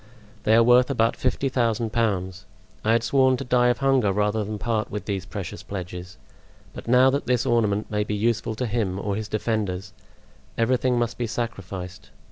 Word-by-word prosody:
They 110 - +5
are 115 - +6
worth 125 +2 +5
about 115 -4 +2
fifty 130 +2 -1
thousand 115 -3 0
pounds. 95 -5 -1 0.4
I 110 - +3
had 115 0 +2
sworn 130 +1 +3
to 135 - -4
die 125 -1 +3
of 120 - +2
hunger 135 -7 +2
rather 105 +2 0
than 105 +1 -4
part 110 -1 -1
with 105 - -5
these 100 -2 -3
precious 95 -4 -6
pledges; 90 -1 -7 0.6
but - - -9
now 125 +2 +5
that 140 +2 -2
this 125 -1 +1
ornament 110 -4 +1
may 105 0 +1
be 105 0 -3
useful 110 +1 0
to 125 - -2
him 105 -5 -1
or 100 0 -2
his 110 0 -4
defenders, 105 -4 -2 0.6
everything 125 +2 +2
must 120 0 -1
be 120 - -1
sacrificed. 95 -6 -5
110 Hz, 185 wpm, -24 LUFS, 100-120 Hz, 0.6 s, are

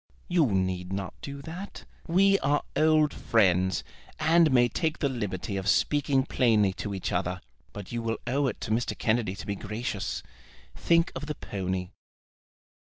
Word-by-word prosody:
"You 175 -5 +3
need 95 -3 -1
not 95 -1 -3
do 140 0 -7
that. 180 +6 -8 0.2
We 195 +3 +4
are 145 +2 +1
old 155 -1 +4
friends, 95 -5 +2 0.4
and 160 +1 +5
may 125 -2 +5
take 160 +7 -1
the 145 - +1
liberty 105 -6 -3
of 95 0 -4
speaking 140 +1 +2
plainly 110 -8 +3
to 105 -2 -3
each 95 - -3
other; 90 0 -1 0.3
but 100 -2 -9
you 120 -1 -2
will 115 0 -2
owe 135 +3 +1
it 120 - -3
to - - -4
Mr. 115 +2 0
Kennedy 110 -4 0
to 100 +3 -8
be 100 -1 -2
gracious. 105 0 -4 0.5
Think 170 0 +2
of 145 +3 -5
the 150 - -3
pony." 95 -4 -4
115 Hz, 165 wpm, -28 LUFS, 95-145 Hz, 0.5 s, and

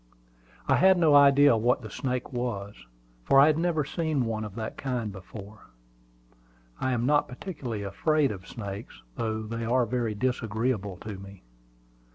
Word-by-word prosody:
I - - +4
had 190 0 +5
no 160 -4 +4
idea 140 -2 +7
what 120 +2 +1
the 110 - -8
snake 125 -1 -3
was, 110 -5 -3 0.5
for 135 - +5
I 140 - +8
had 155 0 +3
never 165 -4 +1
seen 155 -4 -1
one 110 -1 -2
of 105 -2 -7
that 110 -1 -5
kind 125 -6 -3
before. 100 +2 -11 1.1
I 130 - 0
am 120 -1 0
not 145 +2 +3
particularly 125 - -6
afraid 145 +8 +1
of 95 -2 -8
snakes, 100 - -8
though 110 -1 -2
they 115 +2 -5
are 120 +2 +2
very 115 -2 -2
disagreeable 110 -4 -1
to 105 -3 -7
me. 100 -3 -12
120 Hz, 160 wpm, -27 LUFS, 105-140 Hz, 1.1 s, I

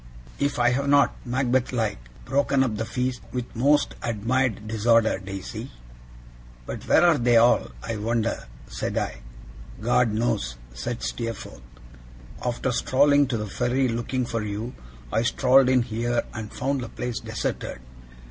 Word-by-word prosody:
If 140 0 0
I 120 0 +4
have 140 +3 0
not 140 0 +5
(Macbeth 125 0 +1
like) 110 - -1 0.3
broken 135 +1 +2
up 115 -5 -1
the 110 - -2
feast 125 +1 -2
with 125 -1 -5
most 145 +5 +3
admired 115 0 0
disorder, 110 -1 +3
Daisy.' 95 -1 -6 1.0
'But - - -7
where - - +5
are 165 -5 +5
they 120 -1 +4
all, 120 +2 +5 0.2
I 115 -1 -3
wonder!' 110 - -1 0.2
said - - -3
I. - - -2 0.6
'God 120 +1 +2
knows,' 110 - -1 0.2
said - - -4
Steerforth. 80 - -5 0.8
'After 125 +1 -1
strolling 140 +3 +4
to 125 -2 -1
the 105 - -3
ferry 125 +5 0
looking 120 +2 -1
for 115 -1 -2
you, 105 +3 -4 0.4
I 110 - +3
strolled 130 +2 +4
in 130 -2 +4
here 120 +1 -1
and 110 -2 -6
found 135 +1 -1
the 120 - -6
place 125 -1 -4
deserted. - - -4
120 Hz, 145 wpm, -25 LUFS, 110-130 Hz, 1.0 s, not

